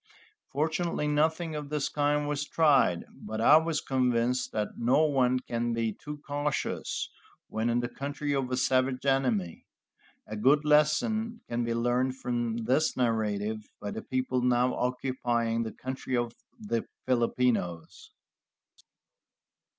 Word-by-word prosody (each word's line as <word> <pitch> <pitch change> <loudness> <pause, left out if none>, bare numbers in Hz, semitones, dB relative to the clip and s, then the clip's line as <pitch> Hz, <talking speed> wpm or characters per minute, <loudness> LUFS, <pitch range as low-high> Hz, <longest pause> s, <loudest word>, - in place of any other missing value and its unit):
Fortunately 155 +1 -1
nothing 160 +2 +1
of 150 -1 -5
the 150 -2 -1
kind 145 0 +1
was 145 0 -2
tried, 140 - +3
but 110 - -6
I 145 +7 +7
was 160 -1 0
convinced 125 -1 +1
that 105 -1 -1
no 125 +7 +4
one 130 -4 +2
can 120 -1 -2
be 115 -1 -1
too 150 +7 -8
cautious 145 0 -2 0.4
when 110 +2 -1
in 120 +1 +2
the 120 - -2
country 145 +3 -3
of 135 -2 -1
a 125 - -1
savage 130 +1 +1
enemy. 125 -11 0 0.6
A 110 - -6
good 140 +7 +3
lesson 215 +10 +2
can 120 0 -1
be 115 0 -1
learned 125 +2 +1
from 120 -2 -2
this 140 +6 +2
narrative 110 -3 -1
by 105 0 -5
the 110 - -5
people 130 -1 -1
now 125 0 +2
occupying 120 -2 -1
the 110 -1 -3
country 130 -1 -4
of 120 -1 -1 0.3
the 205 - -2 0.2
Filipinos. 120 -9 0
130 Hz, 135 wpm, -29 LUFS, 115-145 Hz, 0.6 s, I